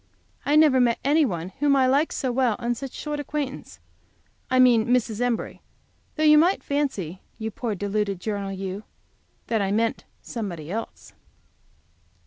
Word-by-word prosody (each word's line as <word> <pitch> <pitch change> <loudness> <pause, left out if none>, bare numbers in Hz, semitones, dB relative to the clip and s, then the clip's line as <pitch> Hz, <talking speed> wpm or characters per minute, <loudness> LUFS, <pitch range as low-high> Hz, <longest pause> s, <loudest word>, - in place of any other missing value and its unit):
I 290 - +3
never 305 -4 +6
met 235 -1 +3
any 300 +2 +4
one 175 -6 -3
whom 285 0 +3
I 265 -1 +4
liked 280 +5 +2
so 260 -3 -1
well 245 -3 +2
on 240 0 -1
so 270 +3 -6
short 295 +3 -5
acquaintance 290 -1 -5 0.7
I 255 - +2
mean 245 -3 +5
Mrs. 240 -2 +1
Embury, 245 -2 -2 0.5
though 310 - -1
you 300 -1 +7
might 355 +5 +2
fancy, 235 - -2 0.2
you 220 0 -4
poor 220 0 -3
deluded 205 0 -2
journal 200 0 -3
you, 195 +1 -5 0.6
that 225 -3 0
I 195 -1 0
meant 225 +2 0 0.2
somebody 180 - -5
else. 225 +3 -6
240 Hz, 155 wpm, -24 LUFS, 205-280 Hz, 0.7 s, you